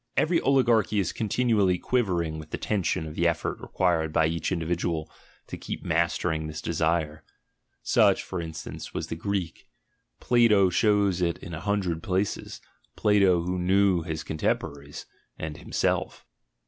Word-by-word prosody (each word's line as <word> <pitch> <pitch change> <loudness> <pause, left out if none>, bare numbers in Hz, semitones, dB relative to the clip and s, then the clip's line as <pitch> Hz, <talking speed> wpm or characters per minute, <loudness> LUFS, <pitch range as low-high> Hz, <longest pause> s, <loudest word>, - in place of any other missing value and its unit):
Every 165 +1 +3
oligarchy 120 -6 +3
is 90 -3 -1
continually 110 -4 +1
quivering 85 -10 -1
with 75 0 -10
the - - -3
tension 95 -6 -1
of 75 - -7
the 85 +2 +1
effort 85 -1 -1
required 85 -4 0
by 80 +1 +3
each 80 +1 -1
individual 85 -2 -2 0.3
to - - -8
keep - - -6
master 85 +2 +1
ing 80 -1 -3
this 75 0 -6
desire. 80 -2 -1 0.6
(Such, - - +3
e.g., 80 -3 -5 0.2
was - - -3
the - - -3
Greek; 90 -1 -4 0.5
Plato 105 -6 +4
shows 100 -2 +2
it 85 -1 0
in 85 - -9
a 80 - -5
hundred 95 -4 -1
places, 95 +3 -2 0.3
Plato, 100 -5 +3
who 90 +1 -2
knew 95 0 +3
his 80 0 -4
contempo 75 -2 -1
raries 70 +1 -10 0.2
— - - -47
and 75 -1 -5
himself.) - - -2
85 Hz, 150 wpm, -26 LUFS, 80-100 Hz, 0.6 s, Plato